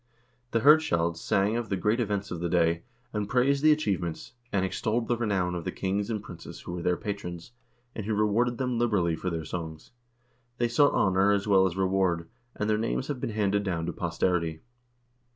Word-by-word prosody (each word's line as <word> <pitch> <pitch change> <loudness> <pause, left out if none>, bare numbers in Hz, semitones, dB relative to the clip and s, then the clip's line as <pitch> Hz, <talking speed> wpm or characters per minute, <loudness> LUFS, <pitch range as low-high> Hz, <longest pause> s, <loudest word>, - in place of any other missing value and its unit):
The 115 -2 0
hirdscalds 85 - +4
sang 100 +3 +1
of 120 -2 -3
the 100 - 0
great 105 +6 +1
events 100 -3 -2
of 85 - -4
the 85 0 -2
day, 85 -1 +2 0.3
and 105 -1 -2
praised 135 +3 +2
the 155 +1 +6
achievements, 95 - -1 0.2
and 95 -2 +1
extolled 110 +5 -1
the 120 - +2
renown 100 -6 0
of 85 -1 -4
the - - -3
kings 100 +2 -2
and 105 -3 -2
princes 85 -6 -10
who - - -7
were 90 - -4
their 90 0 +1
patrons, 90 -3 -6 0.4
and 110 - -5
who 110 - 0
rewarded 110 +4 +1
them 125 -3 -1
liberally 100 -8 +2
for 90 - -3
their 80 -2 -4
songs. 80 -1 -6 0.7
They 120 0 +1
sought 145 +5 +4
honor 95 +1 +3
as 100 -1 +1
well 95 -2 +5
as 90 0 -5
reward, 95 -3 +1 0.3
and 105 - -2
their 110 0 +2
names 115 +4 -2
have 135 -4 -3
been - - -2
handed 100 -2 +1
down 90 -5 -2
to 85 - -3
posterity. 85 -2 -1
100 Hz, 200 wpm, -28 LUFS, 85-115 Hz, 0.7 s, the